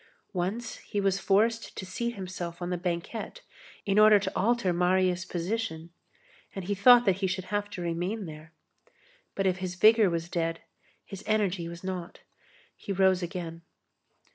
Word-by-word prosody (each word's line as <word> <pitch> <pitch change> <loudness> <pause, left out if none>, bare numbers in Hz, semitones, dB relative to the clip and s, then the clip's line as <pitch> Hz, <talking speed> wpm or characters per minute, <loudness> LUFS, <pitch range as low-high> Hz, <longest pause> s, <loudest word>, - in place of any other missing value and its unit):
Once 205 +6 -3
he 205 - -4
was 195 -1 +1
forced 225 +4 +1
to 190 - -5
seat 235 +6 -3
himself 180 -3 -6
on 175 0 -4
the - - +1
banquette 180 - -4 0.4
in 200 +1 +3
order 215 0 +8
to 200 - -3
alter 225 -3 +2
Marius' 180 +1 +2
position, 175 -2 -3 0.6
and 195 -2 -5
he 205 - -1
thought 245 +4 +7
that 190 -3 +3
he 195 -1 0
should 185 0 -2
have 205 0 -1
to 180 -3 -6
remain 180 +5 -2
there. 155 0 -10 0.8
But 195 - -1
if 185 -1 +2
his 185 -1 -4
vigor 215 +2 +6
was 170 -1 -2
dead, 165 -1 -2 0.4
his 195 -3 -9
energy 195 -5 0
was 170 +1 -9
not. 185 -2 -5 0.5
He - - -7
rose 190 -1 +3
again. 170 -2 -5
185 Hz, 165 wpm, -28 LUFS, 175-205 Hz, 0.8 s, order